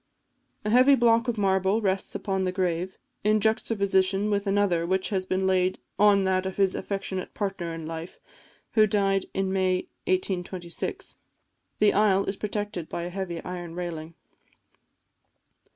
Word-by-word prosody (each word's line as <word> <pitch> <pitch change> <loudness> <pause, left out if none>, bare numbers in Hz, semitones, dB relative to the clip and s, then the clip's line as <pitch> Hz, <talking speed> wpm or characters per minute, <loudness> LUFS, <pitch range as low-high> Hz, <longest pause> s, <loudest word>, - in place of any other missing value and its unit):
A 210 - 0
heavy 255 +4 +6
block 230 -1 +3
of 235 -2 -1
marble 190 +1 +2
rests 195 -3 0
upon 190 -1 -1
the 185 - 0
grave, 180 0 -2 0.3
in 215 +1 +3
juxtaposition 200 -2 +1
with 200 0 0
another 195 -4 +2
which 190 +2 0
has 190 -2 -1
been 190 0 0
laid 185 -1 +2 0.2
on 205 -1 +5
that 190 0 +1
of 190 - -6
his 195 -2 +3
affectionate 195 -1 -4
partner 195 -4 -3
in 165 -1 -6
life, 165 +2 -7 0.5
who 215 -1 +5
died 195 -1 +1
in 190 0 0
May 185 -1 0 0.2
1826. 185 -1 -3 0.6
The 210 -1 +4
aisle 200 -1 +3
is 195 - -2
protected 205 -4 -4
by 170 - -4
a 175 - -5
heavy 180 -3 -4
iron 175 -2 -6
railing. 170 -2 -5
190 Hz, 150 wpm, -26 LUFS, 185-205 Hz, 0.6 s, heavy